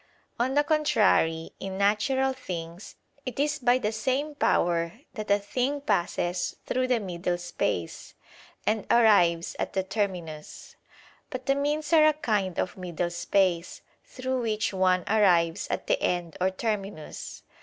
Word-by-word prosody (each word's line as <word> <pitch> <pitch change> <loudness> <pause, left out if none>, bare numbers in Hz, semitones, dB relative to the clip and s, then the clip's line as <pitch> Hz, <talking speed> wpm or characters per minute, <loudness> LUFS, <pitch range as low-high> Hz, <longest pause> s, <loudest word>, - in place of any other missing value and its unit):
On 260 +3 +1
the 290 - +4
contrary, 165 - +2
In 190 0 -5
natural 260 +7 +2
things, 175 -7 -7 0.3
it 255 0 -6
is 300 +2 +1
by 245 -1 +4
the 215 -4 -1
same 260 +7 -1
power 170 -10 +1 0.2
that 215 -3 -6
a 200 - +5
thing 250 +7 -1
passes 175 -8 -1
through 255 0 0
the 250 -2 +2
middle 180 -3 -2
space, 90 - -3 0.5
and 215 -1 0
arrives 180 -8 +4
at - - -2
the 190 - 0
terminus. 180 -7 -4 0.5
But 255 0 -6
the 275 - +3
means 295 +3 -1
are 310 -1 +7
a 310 - +4
kind 210 - -1
of 185 - -2
middle 175 -1 -3
space, 175 0 0 0.2
through 260 0 -3
which 215 -2 -1
one 185 -1 +2
arrives 175 -6 +3
at - - -2
the - - +1
end 175 -2 -1
or 185 - +3
terminus. 195 -5 -5
205 Hz, 145 wpm, -27 LUFS, 175-255 Hz, 0.5 s, are